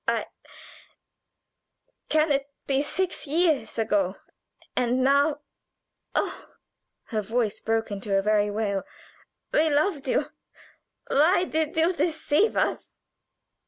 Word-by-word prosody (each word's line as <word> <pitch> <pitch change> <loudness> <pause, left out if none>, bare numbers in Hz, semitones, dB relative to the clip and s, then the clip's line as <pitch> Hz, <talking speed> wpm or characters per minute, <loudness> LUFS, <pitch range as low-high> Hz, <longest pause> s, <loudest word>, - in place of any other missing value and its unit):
I - - +1 1.8
can 310 0 +3
it 275 0 0 0.2
be 275 0 +1
six 360 +2 -2
years 305 -7 +1
ago 205 -4 +1 0.6
and 250 +1 +1
now 285 +2 +3 0.7
oh!" - - -3 0.5
Her 220 -3 -1
voice 220 0 -1
broke 225 -1 -1
into 200 0 -1
a 195 - +1
very 210 0 +2
wail. 205 -2 -1 0.7
"We 315 +1 +4
loved 295 -1 +1
you - - 0 0.7
why 320 +6 +3
did 315 -3 -2
you 330 +3 +3
deceive 325 +3 +1
us?" - - -1
275 Hz, 110 wpm, -26 LUFS, 220-315 Hz, 1.8 s, We